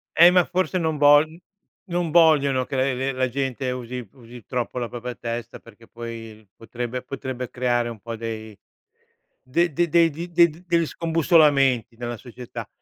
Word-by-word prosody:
Eh 170 +2 +8
ma 180 -1 +4
forse 185 +1 -1
non 160 -3 -1
vogl 145 +2 +5 0.5
non 175 -2 -1
vogliono 145 -6 +4
che 135 - -5
la 130 - +1
le 135 0 0
le 135 +2 -1
la 130 0 0
gente 130 0 -2
usi 125 -1 -6
usi 120 -2 -13
troppo 125 -1 -3
la 120 -1 -3
propria 125 0 -6
testa, 115 0 -6
perché 115 0 -18
poi 115 -2 -9
potrebbe 120 +2 -5
potrebbe 130 -1 -6
creare 120 -1 0
un 115 -2 -8
po' 115 +3 -6
dei 110 -2 -7 0.9
de 170 +7 +1
de 175 +5 +1
degli 165 0 +2
de 170 0 +5 0.2
degli 170 -1 +2
scombussolamenti 150 -8 +3
nella 120 0 -5
società. 125 0 -9
130 Hz, 165 wpm, -23 LUFS, 120-160 Hz, 0.9 s, Eh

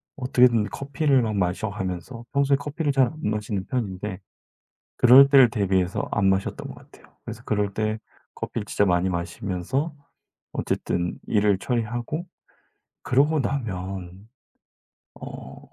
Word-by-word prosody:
어떻게든 125 -4 +3
커피를 140 +2 +1
막 110 -2 -1
마셔 95 +3 0
가면서 100 +4 -5
평소에 140 0 +3
커피를 145 +1 -2
잘 135 -2 +4
안 155 - -12
마시는 105 -2 -2
편인데 105 -5 -3 0.8
그럴 130 +3 +8
때를 135 -4 +7
대비해서 95 -2 0
안 100 -2 +2
마셨던 95 0 -1
것 - - -9
같아요. - - -19
그래서 - - -8
그럴 105 -1 -1
때 110 0 -1 0.4
커피를 105 -3 -4
진짜 105 - +1
많이 90 0 +2
마시면서 95 - -3 0.6
어쨌든 85 0 -2
일을 105 -2 +2
처리하고 120 - -2 0.8
그러고 145 +4 +2
나면 95 -6 -4 0.9
어 - - -9
110 Hz, 285 characters per minute, -24 LUFS, 95-135 Hz, 0.9 s, 그럴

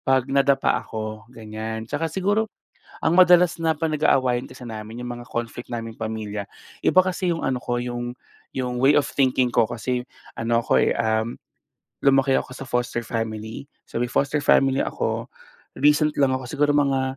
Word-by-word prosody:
'pag 130 -1 +2
nadapa 140 0 +3
ako, 110 0 -6
ganyan. 110 -1 -6
Tsaka 150 +7 -2
siguro 205 +6 0 0.6
ang 170 +3 +4
madalas 180 -2 +6
na 160 -1 +1
pa 160 +1 -1
nag-aawayan 130 -5 +2
kasi 130 0 -12
namin 110 +1 -7
yung 120 - -4
mga 120 - -11
conflict 120 +1 -5
naming 115 -2 -6
pamilya, 105 -2 -4 0.3
iba 185 - +4
kasi 180 -2 -1
yung - - -5
ano 125 -1 0
ko, 120 0 -2
yung 120 0 -4 0.4
yung 125 -1 -2
way 135 +3 +5
of 145 - +4
thinking 130 -3 +1
ko, 115 -2 +3
kasi 125 +1 -3 0.3
ano 115 0 +1
ako, - - +3
eh, - - +2
um, 110 0 0 0.7
lumaki 135 -1 +4
ako 130 - -3
sa 130 +1 -8
foster 120 -1 -1
family. 115 0 -4 0.2
So, - - -8
may 120 - -2
foster 145 +1 +1
family 135 -1 +4
ako. - - -3 0.5
Recent 150 +1 +4
lang 130 -1 +3
ako, 130 - -7
siguro 145 0 +2
mga 135 -2 +1
125 Hz, 170 wpm, -23 LUFS, 115-145 Hz, 0.7 s, madalas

